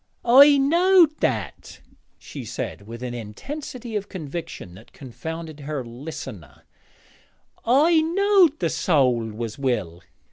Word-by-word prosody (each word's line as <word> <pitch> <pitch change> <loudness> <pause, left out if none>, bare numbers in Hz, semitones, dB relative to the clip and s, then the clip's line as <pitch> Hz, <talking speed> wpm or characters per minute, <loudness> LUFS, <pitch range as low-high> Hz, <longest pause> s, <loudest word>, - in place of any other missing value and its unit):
'I 280 +4 +8
knowed 335 +3 +4
that,' 110 -7 -3 0.4
she - - -9
said, 100 - -6
with 115 +2 -8
an 125 -1 -4
intensity 235 - -7
of 205 -1 -3
conviction 160 - -7
that 105 +5 -16
confounded 160 +4 -8
her 145 -2 -5
listener, 115 - -9 1.0
'I 310 +7 +4
knowed 360 -1 +3
the - - -2
soäl 125 - +1
was 115 +3 -6
will.' 95 -11 -2
155 Hz, 115 wpm, -23 LUFS, -, 1.0 s, I